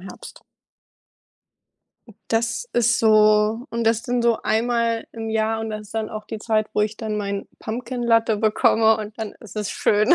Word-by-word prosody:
Herbst. 185 +1 -11 1.6
Hm, 225 - -16
das 230 - -1
ist 240 +1 +2
so 215 +1 +4
und 230 0 -2
das 225 0 +2
dann 245 0 -1
so 235 -1 +3
einmal 230 0 0
im 225 -1 -5
Jahr 220 0 0
und 220 0 -4
das 215 0 -5
ist 210 +1 -15
dann 220 -1 -2
auch 215 0 -6
die 220 - -6
Zeit, 215 0 0
wo - - +2
ich 210 0 0
dann 215 -2 -3
meinen 200 -1 -3
Pumpkin 240 +2 -5
Latte 230 -2 +3
bekomme, 220 +1 +3
und 215 0 -7
dann 220 -2 -4
ist 215 -2 -13
es 210 -1 -2
schön. 210 0 +3
220 Hz, 185 wpm, -22 LUFS, 215-230 Hz, 1.6 s, so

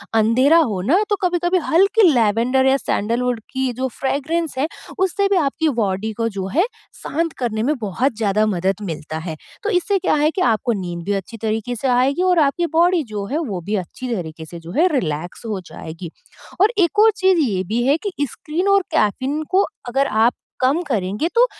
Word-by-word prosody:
अंधेरा 245 +8 +4
हो 220 - +1
ना 270 - +3
तो 410 - +3
कभी-कभी 350 0 +1
हल्की 395 +5 +4
लैवेंडर 240 +3 +2
या 265 +1 +4
सैंडलवुड 240 0 -1
की 265 -1 -1
जो 260 +2 -2
फ्रेगरेंस 305 +3 -1
है, 275 +4 +1 0.3
उससे 380 +2 +1
भी 400 - +3
आपकी 315 +1 +1
बॉडी 200 +1 -1
को 230 -1 0
जो 195 -3 -4
है, 350 +5 +4 0.4
शांत 330 +1 -1
करने 220 -3 -1
में 295 +5 +1
बहुत 225 +6 -1
ज़्यादा 215 -1 +2
मदद 190 -2 0
मिलता 155 -2 -5
है। 160 - -4 0.3
तो 425 - -1
इससे 395 0 +1
क्या - - +1
है 305 - +3
कि 370 - -3
आपको 230 +2 +1
नींद 175 -1 -5
भी 205 - 0
अच्छी 225 +5 -11
तरीके 220 +2 -2
से 260 +4 -2
आएगी 260 +7 +2
और 355 - +4
आपकी 345 +5 -2
बॉडी 345 0 +4
जो 205 -1 -3
है 300 - 0
वो 210 - -4
भी 215 - +1
अच्छी 250 +7 -6
तरीके 160 -4 -6
से 170 +2 -9
जो 165 +1 -10
है 360 - +5
रिलैक्स 160 +5 -5
हो 210 -4 -3
जाएगी। 165 +1 -8 0.5
और 420 +3 +5
एक 385 +2 +2
और 440 +1 +7
चीज़ 375 -2 +3
ये 185 -2 -1
भी 225 +6 -1
है 285 - +4
कि - - -2 0.2
स्क्रीन 335 +6 -3
और 395 0 +5
कैफ़ीन 265 +8 0
को 385 +2 +4 0.2
अगर 270 +3 +1
आप 225 +1 +3 0.3
कम 270 +6 +2
करेंगे 210 - -1
तो 480 +2 +6
255 Hz, 200 wpm, -20 LUFS, 205-330 Hz, 0.5 s, और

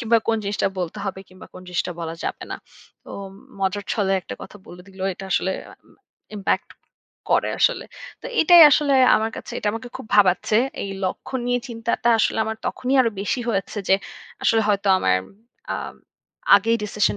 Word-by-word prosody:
কিংবা 230 -1 +3
কোন 225 - +3
জিনিসটা 200 0 0
বলতে 175 -3 -4
হবে 190 -1 -4
কিংবা 185 0 -14
কোন 185 - -10
জিনিসটা 180 0 -2
বলা 165 -1 -4
যাবে - - -4
না। - - -3 0.5
তো - - -12 0.5
মজার 195 +1 -1
ছলে 195 -3 0
একটা - - -8
কথা - - -11
বলে 180 0 -12
দিলো। 190 -1 -10
এটা 195 - -9
আসলে 190 - +1 0.8
ইমপ্যাক্ট 195 - -1 0.6
করে - - +2
আসলে। - - +2 0.4
তো - - -6
এটাই 340 +1 +8
আসলে 290 -1 +3 0.2
আমার 220 +1 -1
কাছে - - -8
এটা 210 - -1
আমাকে 225 +2 -6
খুব - - -10
ভাবাচ্ছে। 195 +2 +4 0.3
এই 195 - -5
লক্ষ্য 185 +7 -4
নিয়ে 245 0 +1
চিন্তাটা 230 0 -1
আসলে - - +1
আমার 220 0 -3
তখনই 260 +2 -1
আরো 230 -3 +2
বেশি 205 +5 -1
হয়েছে 195 0 -2
যে 190 - +6 0.5
আসলে 225 -1 +3
হয়তো 200 -1 +1
আমার 95 - +2 0.6
আ - - -2 0.8
আগেই 230 +3 +1
ডিসিশন 210 0 0
205 Hz, 170 wpm, -22 LUFS, 190-230 Hz, 0.8 s, এটাই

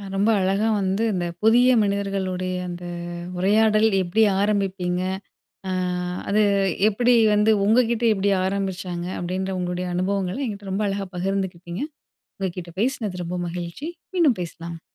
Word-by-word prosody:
ரொம்ப 200 +3 +2
அழகா 195 +3 +1
வந்து, 190 +3 0
இந்த 180 -2 -1 0.2
புதிய 240 +3 +6
மனிதர்களுடைய 195 -2 -1 0.2
அந்த 175 0 -7 0.5
உரையாடல் 215 +3 +4
எப்டி 185 +5 +1 0.2
ஆரம்பிப்பீங்க? 190 -3 0 0.7
அ - - -1 0.6
அது 210 +2 +3 0.5
எப்டி 245 +4 +3 0.2
வந்து, 210 +1 +4 0.2
உங்ககிட்ட 235 +1 +3
எப்டி 200 0 +1
ஆரம்பிச்சாங்க? 185 -2 -2
அப்டின்ற 185 +2 -2
உங்களுடைய 180 0 -2
அனுபவங்களை 190 +3 -1
என்கிட்டே 200 -3 -6
ரொம்ப 210 +2 0
அழகா 195 0 -2
பகிர்ந்துக்கிட்டீங்க. 185 +1 -3 0.6
உங்க 190 -1 -1
கிட்ட 170 -1 -6
பேசினது, 215 -7 -1
ரொம்ப 180 +1 -3
மகிழ்ச்சி. 175 - -5 0.3
மீண்டும் 305 - +3
பேசலாம். 170 0 -7
195 Hz, 125 wpm, -23 LUFS, 180-210 Hz, 0.7 s, புதிய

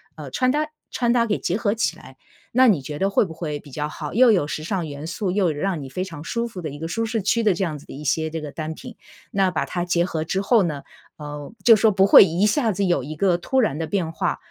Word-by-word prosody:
呃， 150 -3 -8
穿 255 - +1
搭 295 - 0 0.3
穿 240 -2 0
搭 235 -1 +3
给 210 -3 -1
结 180 - -1
合 210 -3 0
起 210 -8 -1
来。 130 0 -15 0.4
那 255 +2 +6
你 190 - +3
觉 145 +2 -7
得 195 - +2
会 200 - +3
不 175 -5 -6
会 155 -3 -5
比 145 - -15
较 150 +2 -3
好？ 150 -1 -7
又 250 +3 +6
有 190 -9 +3
时 155 - -4
尚 180 -1 -2
元 145 0 -7
素， 180 +3 -2
又 185 -4 +1
让 165 +2 -2
你 135 - -7
非 180 +8 -4
常 165 -6 -8
舒 235 +9 -2
服 200 - -9
的 155 - -4
一 145 +1 -9
个 165 +1 -5
舒 225 +6 -1
适 225 0 -2
区 225 +4 +1
的 210 -3 +4
这 180 - -2
样 160 -5 -2
子 - - -17
的 - - -11
一 140 +3 -8
些 160 +2 0
这 160 0 -5
个 150 -1 -7
单 155 +1 -5
品。 240 +7 -11 0.3
那 195 -1 +2
把 - - -1
它 175 -1 -3
结 170 -1 +1
合 160 -3 -3
之 190 +4 -1
后 225 +2 +4
呢， 150 -5 -3 0.3
呃， 145 +1 -8
就 225 0 +7
说 220 0 +3
不 190 0 +4
会 200 - +9
一 180 +3 +1
下 225 0 +2
子 200 +2 -1
有 175 -9 +1
一 155 +2 -6
个 180 +2 +2
突 260 +9 +1
然 210 - 0
的 160 0 -3
变 175 -4 -1
化， 160 - -1
175 Hz, 305 characters per minute, -22 LUFS, 155-210 Hz, 0.4 s, 会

